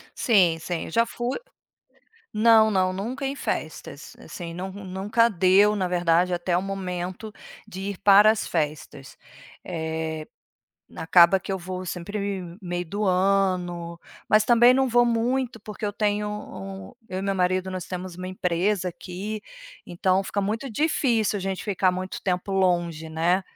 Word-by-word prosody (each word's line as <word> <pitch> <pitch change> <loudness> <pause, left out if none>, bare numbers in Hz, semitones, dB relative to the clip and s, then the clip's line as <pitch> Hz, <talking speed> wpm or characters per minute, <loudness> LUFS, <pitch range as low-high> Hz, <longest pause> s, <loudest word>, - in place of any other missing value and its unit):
Sim, 185 -8 +3
sim, 170 +1 -4
eu - - -9
já 230 +6 +3
fui 240 +2 -3 1.0
Não, 220 0 +5
não, 185 -2 +1
nunca 245 +9 -4
em 275 - -2
festas, - - -5
assim. 170 -2 -8
Não, 185 +3 -5
nunca 200 +4 0
deu, 195 +3 +4
na 185 -3 -1
verdade, 175 0 +2
até 175 0 0
o 180 - 0
momento 185 +1 -5 0.3
de 190 -3 -8
ir 195 - -7
para 205 +2 +7
as 220 - -1
festas. 150 -4 -4 0.5
Eh, 160 -2 -4 0.7
acaba 175 +3 +5
que - - -8
eu 190 - -1
vou 185 +1 -6
sempre 200 +2 -4 0.2
meio 175 -1 -3
do 205 +5 -3
ano, 180 -3 0 0.3
mas 215 0 +5
também 240 +2 +6
não 265 0 +3
vou 240 0 +4
muito, 240 +1 0
porque 210 +1 -8
eu 205 - -2
tenho 210 0 0
um 195 -1 -8 0.2
eu 185 +1 -4
e - - -5
meu 195 0 -1
marido, 185 0 0
nós 185 -2 -5
temos 180 -1 -6
uma 185 0 -6
empresa 185 +1 0
aqui, 190 +5 -6 0.5
então 185 +2 +1
fica 200 +1 -2
muito 225 +6 -3
difícil 230 -6 +1
a - - -6
gente 190 0 -4
ficar 190 -3 +2
muito 185 +1 -5
tempo 185 +1 -2
longe, 175 -4 0
né, 170 +4 +1
190 Hz, 160 wpm, -25 LUFS, 180-210 Hz, 1.0 s, para